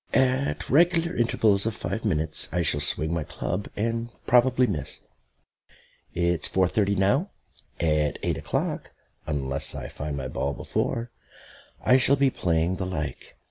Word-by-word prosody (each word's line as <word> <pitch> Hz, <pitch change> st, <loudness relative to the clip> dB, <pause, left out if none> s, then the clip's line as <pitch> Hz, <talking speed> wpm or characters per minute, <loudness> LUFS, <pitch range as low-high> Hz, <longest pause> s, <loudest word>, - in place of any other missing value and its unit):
At 130 Hz, +1 st, +1 dB
regular 170 Hz, +3 st, +3 dB
intervals 110 Hz, -3 st, +2 dB
of 110 Hz, -, -2 dB
five 100 Hz, +6 st, -4 dB
minutes 80 Hz, -6 st, +1 dB
I 85 Hz, +1 st, 0 dB
shall 75 Hz, -2 st, +2 dB
swing 80 Hz, +2 st, 0 dB
my 85 Hz, -2 st, -1 dB
club 90 Hz, +6 st, -4 dB
and 115 Hz, +2 st, -1 dB, 0.2 s
probably 125 Hz, +1 st, +4 dB
miss. 75 Hz, -, -4 dB, 1.1 s
It's 85 Hz, -1 st, +1 dB
four 95 Hz, -1 st, +2 dB
thirty 100 Hz, +1 st, +1 dB
now; 125 Hz, -, +2 dB, 0.5 s
at 75 Hz, -3 st, +1 dB
eight -, -, -1 dB
o'clock, -, -, -3 dB, 0.3 s
unless 70 Hz, -3 st, 0 dB
I -, -, -6 dB
find 75 Hz, -1 st, -5 dB
my 65 Hz, -1 st, -3 dB
ball 70 Hz, +2 st, -2 dB
before, 115 Hz, 0 st, -2 dB, 0.7 s
I 125 Hz, -, +6 dB
shall 135 Hz, +2 st, +4 dB
be 135 Hz, -1 st, +3 dB
playing 85 Hz, -1 st, 0 dB
the 95 Hz, -, -2 dB
like. 75 Hz, -6 st, -5 dB
95 Hz, 145 wpm, -26 LUFS, 80-120 Hz, 1.1 s, I